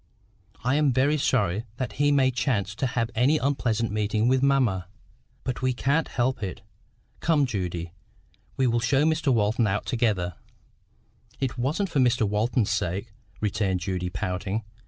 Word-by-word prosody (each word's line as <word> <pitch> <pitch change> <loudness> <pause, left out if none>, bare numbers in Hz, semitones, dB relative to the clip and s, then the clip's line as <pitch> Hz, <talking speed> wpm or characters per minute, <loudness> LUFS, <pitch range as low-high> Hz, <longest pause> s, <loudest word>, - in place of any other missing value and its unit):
I 125 +2 +1
am 150 -2 +3
very 140 +4 +2
sorry 105 -5 +1
that 130 -2 -3
he 145 0 +4
may 135 -2 +4
chance 115 -5 -1
to 130 +5 -1
have 120 -2 -1
an 125 +3 +3
unpleasant 120 -5 0
meeting 105 +1 0
with 130 +1 +3
mamma; 125 -10 +2 0.6
but 130 -1 -3
we 130 0 +1
can't 140 +6 +1
help 125 0 -1
it. 95 -3 -5 0.6
Come, 155 -4 +3
Judy, 90 -7 -3 0.7
we 130 - +2
will 120 -1 +2
show 135 +5 +2
Mr 155 -2 +2
Walton 110 0 +2
out 100 +1 -1
together." 100 -8 0 1.0
"It 135 -3 -1
wasn't 150 +11 -1
for 150 - 0
Mr 120 -4 +3
Walton's 110 +2 +1
sake," 100 +5 -2 0.3
returned 100 -3 0
Judy, 90 -1 -2
pouting. 95 +3 -3
120 Hz, 155 wpm, -26 LUFS, 105-130 Hz, 1.0 s, he